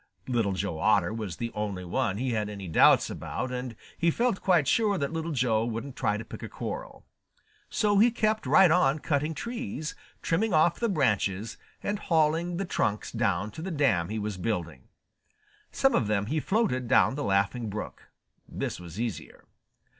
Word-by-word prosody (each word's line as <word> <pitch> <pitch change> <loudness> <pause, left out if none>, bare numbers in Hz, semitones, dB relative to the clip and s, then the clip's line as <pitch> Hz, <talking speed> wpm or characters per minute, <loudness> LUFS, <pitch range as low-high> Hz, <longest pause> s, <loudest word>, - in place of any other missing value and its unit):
Little 115 -6 +1
Joe 95 -4 -3
Otter 105 0 +3
was 105 -6 -4
the 115 -1 -4
only 100 -4 -3
one 95 +2 -1
he 130 +2 -1
had 105 -2 -1
any 100 -2 -7
doubts 80 - +5
about, 130 - -4
and 125 -2 -4 0.2
he 170 - +3
felt 235 +3 0
quite 175 -7 +3
sure 210 -3 +2
that 140 0 -2
Little 165 0 -3
Joe 120 -6 +1
wouldn't 115 +3 -4
try 105 - 0
to 110 - -7
pick - - -9
a - - -6
quarrel. - - -6 0.6
So 205 -1 +2
he 230 +3 +6
kept 215 -2 0
right 190 -4 +6
on 155 -5 +3
cutting 150 +1 -1
trees, 235 - -4 0.3
trimming 185 +3 +1
off 165 +2 +3
the 235 - +1
branches, 110 - 0 0.3
and 205 0 -2
hauling 165 0 +1
the 195 - -2
trunks 105 - -1
down 105 -3 0
to 160 - -8
the 185 - -4
dam 130 - +1
he 110 - -3
was 105 -2 -3
building. 85 - -3 0.8
Some 270 0 +2
of 110 - +2
them 105 -1 +1
he 150 +8 -1
floated 185 - 0
down 130 +1 +4
the 145 +2 -3
Laughing 100 +3 0
Brook. 105 +1 -7 0.4
This - - -4
was 90 +2 -9
easier. 115 -4 -5
125 Hz, 180 wpm, -28 LUFS, 105-170 Hz, 0.8 s, he